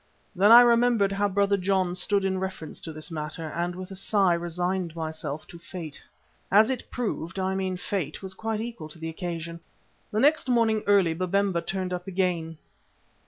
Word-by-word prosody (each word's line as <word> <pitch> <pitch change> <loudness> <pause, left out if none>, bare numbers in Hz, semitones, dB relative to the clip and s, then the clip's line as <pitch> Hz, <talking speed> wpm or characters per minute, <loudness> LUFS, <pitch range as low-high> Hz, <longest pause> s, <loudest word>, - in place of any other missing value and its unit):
Then 200 +4 +5
I 240 +1 +11
remembered 235 -4 +4
how 200 +1 +1
Brother 200 +1 +2
John 185 -1 +1
stood 195 +2 +1
in 190 -1 0
reference 190 -5 -5
to 165 - -6
this 155 +2 -6
matter, 155 +1 -4
and 175 +2 -2
with 185 +1 -8
a - - -6
sigh 195 -1 +2
resigned 175 0 -2
myself 160 -2 -5
to 170 - -11
fate. 165 -4 -6 0.5
As 215 +5 +6
it 255 - -5
proved 200 -8 -3
it, - - -1
I 190 0 0
mean 190 -1 -2
Fate, 180 -4 -3
was 190 0 -3
quite 220 -1 -3
equal 230 -9 -6
to 155 - -11
the 165 0 -5
occasion. 170 -1 -5 0.5
The - - -31
very 280 - +8
next 315 -4 -6
morning, 225 -3 +3
early, 195 -5 +4
Babemba 185 +1 0
turned 185 +1 -3
up 180 +1 -5
again. 175 -4 -1
185 Hz, 190 wpm, -26 LUFS, 170-200 Hz, 0.5 s, I